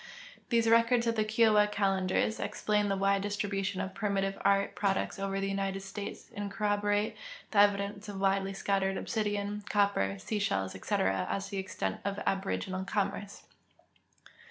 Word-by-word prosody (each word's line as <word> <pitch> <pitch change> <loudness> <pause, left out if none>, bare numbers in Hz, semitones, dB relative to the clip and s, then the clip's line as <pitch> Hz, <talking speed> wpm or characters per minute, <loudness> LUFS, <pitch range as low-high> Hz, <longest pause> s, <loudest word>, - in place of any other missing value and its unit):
These 230 -2 +3
records 230 +1 +4
of 230 - +2
tlie 215 -1 0
KioAva 215 -2 +4
calendars 195 +1 +1
explain 210 0 0
the 195 - 0
Avide 195 0 +2
distribution 200 -2 -2
of 190 - -4
primitive 195 -1 -1
art 200 0 +3
products 195 -1 -1
over 195 0 -1
the 195 - -1
United 195 0 -2
States 195 +1 -7
and 205 -2 -4
corroborate 205 0 0 0.4
the 205 - +3
evidence 205 0 +2
of 205 - -6
Avidely 195 0 +1
scattered 195 -1 0
obsidian, 205 -1 -2
copper, 200 - +2
sea 210 - -3
shells, 95 - 0
etc., 95 0 0
as 195 - -1
to 200 - -10
the 200 - -3
extent 95 - -3
of 200 0 -2
aboriginal 190 -1 -1
commerce. 200 0 -3
200 Hz, 155 wpm, -31 LUFS, 195-205 Hz, 0.4 s, records